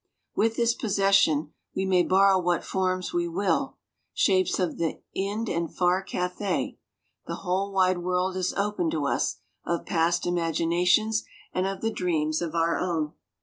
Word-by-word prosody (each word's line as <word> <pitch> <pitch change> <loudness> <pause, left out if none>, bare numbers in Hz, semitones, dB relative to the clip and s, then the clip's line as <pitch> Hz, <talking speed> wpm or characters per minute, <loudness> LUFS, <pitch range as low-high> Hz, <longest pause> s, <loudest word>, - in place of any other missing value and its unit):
With 225 +1 +2
this 235 0 +2
possession 195 - +2 0.2
we 190 - 0
may 185 -2 +4
borrow 190 +1 +4
what 175 -1 0
forms 185 -1 -1
we 175 0 0
will 195 +9 -1 0.4
shapes 185 -2 +2
of 180 -3 -1
the 165 -2 -1
Ind 205 +4 -2
and 170 -3 -2
far 180 +1 +2
Cathay 180 +1 -2 0.5
the - - -3
whole 190 +2 0
wide 185 -2 +2
world 180 +1 0
is 185 -1 0
open 200 -4 0
to 155 -3 -1
us 140 - 0 0.3
of 170 0 -2
past 170 -1 +1
imaginations 175 +5 +2 0.3
and 185 +1 0
of 195 0 -4
the 225 - 0
dreams 160 -5 0
of 170 -1 -3
our 165 0 +1
own. 160 -4 -1
180 Hz, 155 wpm, -26 LUFS, 170-195 Hz, 0.5 s, may